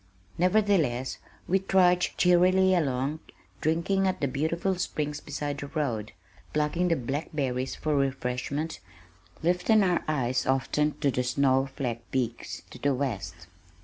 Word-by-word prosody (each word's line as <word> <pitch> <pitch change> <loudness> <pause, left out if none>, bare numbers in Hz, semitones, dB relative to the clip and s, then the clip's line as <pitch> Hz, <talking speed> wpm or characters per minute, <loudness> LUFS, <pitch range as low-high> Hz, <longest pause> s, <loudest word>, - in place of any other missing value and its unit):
Nevertheless 180 - +2 0.3
we 190 +2 +3
trudged 180 -2 +3
cheerily 185 +1 +4
along, 140 -2 0 0.4
drinking 180 +5 +1
at 185 - -1
the 140 - +1
beautiful 160 +8 0
springs 150 -4 -2
beside 145 -1 -4
the 145 - -5
road, 125 -9 -2 0.4
plucking 155 -1 +1
blackberries 135 -2 -2
for 155 -1 -1
refreshment, 135 +3 -2 0.6
lifting 180 +5 +3
our 180 -2 +1
eyes 130 -5 0
often 145 +3 +1
to 140 -2 +3
the 125 - 0
snow 135 +1 +2
flecked 120 -4 -4
peaks 120 -3 -3
to - - -10
the 140 -1 +1
west. 95 -10 -4
145 Hz, 125 wpm, -28 LUFS, 130-175 Hz, 0.6 s, cheerily